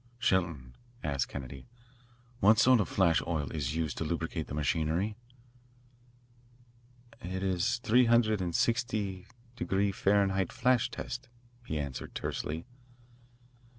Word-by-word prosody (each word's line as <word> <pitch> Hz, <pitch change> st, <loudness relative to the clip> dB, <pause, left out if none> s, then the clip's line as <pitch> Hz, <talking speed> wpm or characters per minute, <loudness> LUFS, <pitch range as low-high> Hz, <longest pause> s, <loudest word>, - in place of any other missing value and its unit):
"Shelton," 85 Hz, -, 0 dB, 0.3 s
asked 70 Hz, -4 st, 0 dB
Kennedy, 65 Hz, -1 st, -8 dB, 0.7 s
"what 110 Hz, +1 st, +6 dB
sort 125 Hz, +1 st, +6 dB
of 105 Hz, -, 0 dB
flash 85 Hz, -4 st, +3 dB
oil 80 Hz, -4 st, -2 dB
is 75 Hz, -2 st, -2 dB
used 80 Hz, -5 st, -2 dB
to -, -, -1 dB
lubricate -, -, -3 dB
the 70 Hz, -, -5 dB
machinery?" 80 Hz, +7 st, 0 dB, 2.1 s
"It 95 Hz, +1 st, -4 dB
is 95 Hz, +6 st, +1 dB
three 125 Hz, 0 st, +5 dB
hundred 115 Hz, -3 st, +3 dB
and 85 Hz, -2 st, -2 dB
sixty 110 Hz, -6 st, 0 dB, 0.3 s
degree 100 Hz, -2 st, 0 dB
Fahrenheit 95 Hz, -2 st, +2 dB
flash 125 Hz, -1 st, +2 dB
test," 125 Hz, 0 st, -6 dB, 0.4 s
he 80 Hz, -, -2 dB
answered 70 Hz, -4 st, -5 dB
tersely. 80 Hz, +2 st, -3 dB
95 Hz, 120 wpm, -31 LUFS, 80-110 Hz, 2.1 s, what